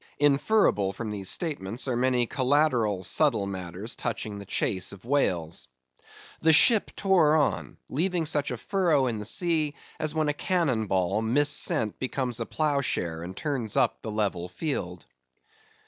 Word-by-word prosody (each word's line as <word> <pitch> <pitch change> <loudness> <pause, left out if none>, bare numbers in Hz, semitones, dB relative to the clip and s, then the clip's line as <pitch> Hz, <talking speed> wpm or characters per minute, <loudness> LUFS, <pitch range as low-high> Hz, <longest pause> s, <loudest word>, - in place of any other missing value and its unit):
Inferable 140 - +2
from 110 +2 -5
these 100 -3 -4
statements, 130 - -2
are 125 - 0
many 125 0 +1
collateral 125 -7 +1
subtile 115 - +2
matters 95 +2 -6
touching 105 -2 -4
the 100 - -10
chase 95 -1 -1
of 100 +1 -14
whales. 85 - -1 0.7
The 160 - +4
ship 220 +7 +6
tore 175 -6 +3
on; 150 -3 -1
leaving 175 +3 -1
such 150 -2 +1
a 125 - -4
furrow 170 - +1
in 115 -4 -2
the 105 - -6
sea 155 - +1 0.2
as 155 0 -1
when 155 -1 +1
a 150 - +1
cannon 145 - 0
ball, 95 +2 0
missent, 120 -3 +2
becomes 130 -2 -2
a 115 - -3
plough 150 -3 0
share 80 -10 -3
and 90 +2 -8
turns 135 -9 -2
up - - +1
the 110 - -6
level 100 -5 -2
field. 90 - -4
125 Hz, 155 wpm, -26 LUFS, 100-150 Hz, 0.7 s, ship